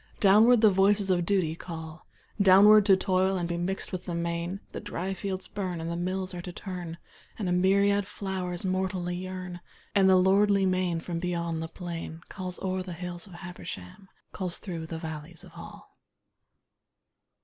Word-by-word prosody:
Downward 215 +4 +6
the 215 -2 +7
voices 195 +1 +3
of 175 -2 +1
Duty 185 -6 +2
call 160 -2 -8 0.3
Downward, 200 +2 +7
to 195 -2 +7
toil 190 0 +1
and 175 -1 -1
be 170 - -2
mixed 180 +3 -2
with 185 -1 -5
the 175 - -3
main, 170 +2 -2
The - - -6
dry 195 -2 -3
fields 190 0 -4
burn, 185 -4 -4
and 165 +1 -4
the - - -2
mills 185 +2 -2
are 175 - -5
to 180 - -7
turn, 175 -3 -6 0.4
And 205 - -2
a - - 0
myriad 200 +2 +3
flowers 185 -3 -4
mortally 185 -1 -1
yearn, 185 -1 -6 0.3
And 195 -1 +5
the 190 - +7
lordly 195 +1 +4
main 185 -3 0
from 170 0 -4
beyond 170 -2 -2
the 160 - -3
plain 165 -2 -7
Calls 185 -2 -5
o'er 185 0 -1
the 180 -1 -6
hills 175 +1 -6
of 190 - -13
Habersham, 175 - -9 0.2
Calls 180 -2 -3
through 165 -4 -6
the 165 - -5
valleys 160 0 -7
of - - -14
Hall. - - -12
185 Hz, 175 wpm, -28 LUFS, 170-190 Hz, 0.4 s, the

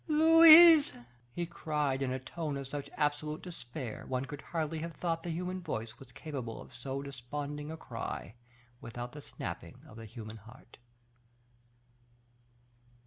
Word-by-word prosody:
"Louise!" 325 0 +9 0.4
he 175 +7 -3
cried, 150 -5 -2
in 130 -2 0
a 130 - -1
tone 150 +2 -4
of 140 - -5
such 140 +1 -6
absolute 150 +1 -1
despair, 125 - -7
one 130 0 -2
could 145 +1 -8
hardly 160 -1 -3
have 165 +1 -5
thought 165 -2 -2
the 175 - -6
human 180 +3 -3
voice 115 -9 -5
was 130 -2 -14
capable 130 -4 -6
of - - -12
so 135 +3 -5
desponding 145 +3 -6
a 160 - -6
cry, 115 -6 -6 0.5
without 120 +1 -6
the 150 - -9
snapping - - -7
of 110 - -13
the 115 - -8
human 110 0 -9
heart. 115 +3 -16
145 Hz, 145 wpm, -32 LUFS, 125-165 Hz, 0.5 s, Louise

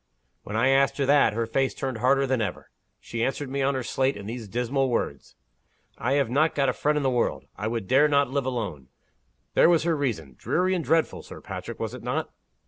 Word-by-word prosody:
When 105 - -7
I 120 +4 +3
asked 135 +1 +3
her 140 - +1
that, 140 -4 +4
her 115 +1 -1
face 135 +4 0
turned 130 -4 -3
harder 135 +3 +3
than 130 -3 0
ever. 100 -5 -4 0.3
She 115 -1 -4
answered 135 +1 -2
me 140 0 -1
on 135 +1 +1
her 130 - -2
slate 135 +1 0
in 100 - -8
these 115 0 -6
dismal 125 +5 0
words: 70 - -3 0.6
'I 130 +4 0
have 140 -2 +2
not 155 +5 +2
got 140 -2 +2
a - - 0
friend 150 0 0
in 150 - 0
the 135 - +2
world. 120 -1 0
I 105 +2 -3
dare 135 +9 +4
not 140 -3 +2
live 140 -1 -1
alone.' 100 - -4 0.7
There - - +6
was 170 -3 +4
her 165 -1 +1
reason! 110 - -2
Dreary 185 +2 +1
and 175 -3 -1
dreadful, 165 +1 +1
Sir - - -11
Patrick, - - -7
was - - -3
it - - -8
not?" - - -2
135 Hz, 220 wpm, -26 LUFS, 115-140 Hz, 0.7 s, There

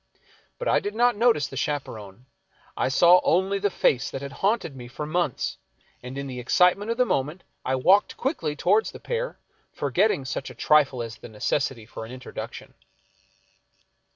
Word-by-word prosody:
But - - -4
I - - +4
did 205 +1 -5
not 245 0 +3
notice 225 - +3
the 135 - -10
chaperon. 120 -7 -4 0.5
I - - 0
saw 175 +6 +6
only 190 +3 +2
the 205 +1 +1
face 135 -7 +1
that 135 - -6
had 140 - -6
haunted 195 -3 -1
me 125 -2 -9
for 135 +5 -6
months, 155 -3 -1 0.4
and 125 +2 -8
in 140 - -4
the 130 -2 -6
excitement 180 - +3
of 230 - -1
the 250 - +4
moment 150 - -1 0.2
I 130 - 0
walked 185 +10 +3
quickly 170 - -2
toward 205 +8 +2
the - - -8
pair, - - -3 0.3
forgetting 145 - +1
such 130 - -4
a - - -11
trifle 140 -5 +3
as 115 -1 -7
the - - -11
necessity 115 +2 -1
for 115 - -8
an 110 - -9
introduction. 130 0 -8
150 Hz, 175 wpm, -25 LUFS, 130-200 Hz, 0.5 s, saw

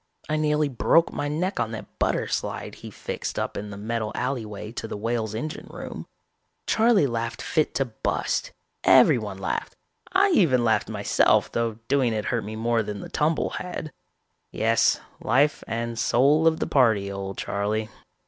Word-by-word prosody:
I 155 - 0
nearly 150 -1 +2
broke 145 +5 +3
my 145 - -2
neck 180 +6 -1
on 110 - 0
that 110 - -9
butter - - +1
slide - - -3
he - - -10
fixed - - -5
up - - -2
in 105 +1 -5
the 100 - -8
metal 110 +1 -2
alleyway 110 -5 -3
to 115 - -5
the - - -5
Whale's 110 0 -2
engine 150 +8 -5
room. - - -8 0.6
Charley 225 -7 +4
laughed 115 -2 -2
fit 155 - 0
to 135 - +1
bust, 115 -3 -2 0.3
everyone 105 -5 +5
laughed, 95 - -3 0.4
I 390 +2 +4
even 160 - +4
laughed 110 -1 +2
myself - - +2
though 115 -2 -1
doing 130 -4 +2
it 105 -1 -2
hurt 115 -2 -1
me 110 +1 -6
more 115 +1 +1
than 105 -1 -5
the - - -8
tumble 155 +1 0
had. 175 -4 -5 0.6
Yes, 115 +1 +2 0.2
life 145 +3 +2
and 115 0 -3
soul 145 +8 +4
of 160 0 +3
the - - 0
party, 110 -7 +3
old 100 0 -5
Charley 105 +2 -2
115 Hz, 165 wpm, -25 LUFS, 110-150 Hz, 0.6 s, everyone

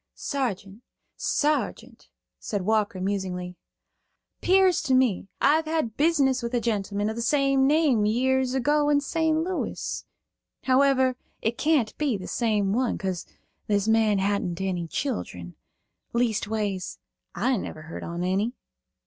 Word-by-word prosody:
"Sargeant, 210 -7 -3 0.3
Sargeant," 300 +1 -1 0.3
said 205 -3 -3
Walker, 210 -2 +1
musingly. 185 -2 -3 0.9
"'Pears 375 -1 +4
to 270 -5 +2
me 250 -8 +2
I've 315 +3 +3
had 310 -9 -1
business 280 -5 +2
with 235 +1 -3
a - - +3
gentleman 205 -3 -1
of 220 - -2
the 235 - -3
same 275 +1 +3
name 285 -8 +3
years 260 +3 +1
ago, 295 +3 +2
in 290 -1 +4
St. 320 +2 0
Louis. 355 +3 -3 0.6
However, 260 -1 +3 0.3
it 225 +2 -1
can't 295 -8 +2
be 285 -8 +1
the 185 - -8
same 210 -4 0
one, 250 +1 0
'cause 185 -3 -3 0.4
this 205 0 +1
man 220 -2 +3
hadn't 195 -3 -1
any 180 -3 -2
children. 90 - -4 0.6
Leastways, 215 -4 -1 0.4
I 260 - +1
never 155 -5 -6
heard 160 - -8
on 170 +1 -4
eny." 195 +6 0
230 Hz, 130 wpm, -26 LUFS, 195-275 Hz, 0.9 s, Pears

